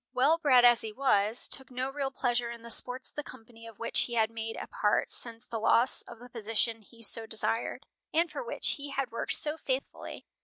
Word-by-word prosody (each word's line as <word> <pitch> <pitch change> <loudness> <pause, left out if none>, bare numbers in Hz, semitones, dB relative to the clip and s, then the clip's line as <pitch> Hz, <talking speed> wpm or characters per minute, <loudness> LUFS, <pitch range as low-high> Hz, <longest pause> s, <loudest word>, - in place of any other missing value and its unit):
Well 280 +6 +3
bred 255 -6 +6
as 240 -1 +6
he 220 - -1
was, 220 -3 +2
took 265 - -2
no 255 +1 -3
real 275 -1 -2
pleasure 240 -3 -1
in 235 -1 -8
the 235 - -1
sports 255 +2 +4
of - - -26
the 295 - -3
company 230 -3 -13
of 225 -3 -12
which 230 - -1
he 240 - -5
had 220 -1 +2
made 225 0 -4
a - - -5
part 210 - 0
since 230 0 -2
the 225 - -4
loss 235 +3 +4
of 235 - -11
the 245 +2 -12
position 225 -1 -2
he 230 +2 -15
so 225 +1 -1
desired, 225 +1 -1 0.3
and 335 +2 +2
for - - -5
which 485 - 0
he 285 0 -6
had 275 -3 -2
worked 230 - -2
so 300 +1 +1
faithfully. 265 -3 -4
240 Hz, 225 wpm, -30 LUFS, 225-265 Hz, 0.3 s, bred